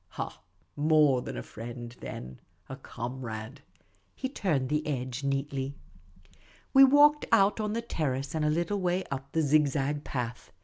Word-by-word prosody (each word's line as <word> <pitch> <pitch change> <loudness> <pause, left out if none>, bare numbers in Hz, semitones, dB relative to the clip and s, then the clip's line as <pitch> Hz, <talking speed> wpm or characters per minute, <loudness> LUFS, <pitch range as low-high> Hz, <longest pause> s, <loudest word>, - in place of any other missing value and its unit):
" - - -42
Ha! - - -5 0.3
more 150 -3 +4
than - - -6
a - - -4
friend, 120 +1 -8
then. 65 0 -8 0.3
A 130 - -6
comrade." 120 -1 -6 0.5
He 260 - -3
turned 155 - -1
the 150 +1 0
edge 130 -2 -3
neatly. 140 0 -2 1.0
We 270 -1 +9
walked 290 +2 +6
out 200 +2 +4
on 210 -1 -1
the 230 +1 -2
terrace 140 - -2
and 160 -1 -1
a 150 - +2
little 170 +6 0
way 180 +1 +1
up 135 0 -5
the 160 - +2
zig 150 +1 +4
zag 145 +1 -1
path. 125 -2 -5
140 Hz, 165 wpm, -29 LUFS, 130-165 Hz, 1.0 s, We